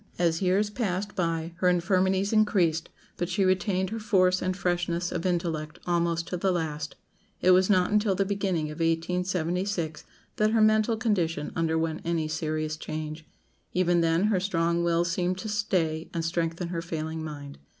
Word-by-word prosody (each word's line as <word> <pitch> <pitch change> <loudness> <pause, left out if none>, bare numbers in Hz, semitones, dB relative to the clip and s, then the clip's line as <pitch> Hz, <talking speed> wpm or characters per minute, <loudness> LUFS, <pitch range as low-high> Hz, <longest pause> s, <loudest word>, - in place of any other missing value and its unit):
As 170 -1 +1
years 195 +3 +2
passed 205 -3 -2
by 165 -2 -1
her 180 0 +3
infirmities 190 +3 +2
increased, 185 -7 +2 0.3
but 175 0 -2
she 195 - +1
retained 190 0 +1
her 225 - -3
force 185 -4 +3
and 185 0 -1
freshness 175 -1 -1
of 170 - -1
intellect 165 -3 -2
almost 170 -1 0
to 180 - -2
the 190 +2 +1
last. 155 -3 -3 0.4
It 185 - +4
was 185 +1 +5
not 185 -2 +3
until 210 -2 +2
the 195 +1 +1
beginning 190 -6 -1
of 150 - -9
1876 175 +1 -1 0.3
that 215 0 +3
her 225 - +3
mental 215 +1 +4
condition 175 -10 0
underwent 160 -1 0
any 165 -2 -1
serious 155 0 -2
change. 155 0 -6 0.5
Even 175 -1 +3
then 165 +2 +2
her 210 -3 +2
strong 170 -2 0
will 170 0 +2
seemed 180 +1 -1
to 205 - -5
stay 185 -7 -1
and 165 -1 -1
strengthen 170 +1 -1
her 170 -1 -3
failing 160 -1 -4
mind. 145 -2 -8
175 Hz, 165 wpm, -27 LUFS, 165-190 Hz, 0.5 s, was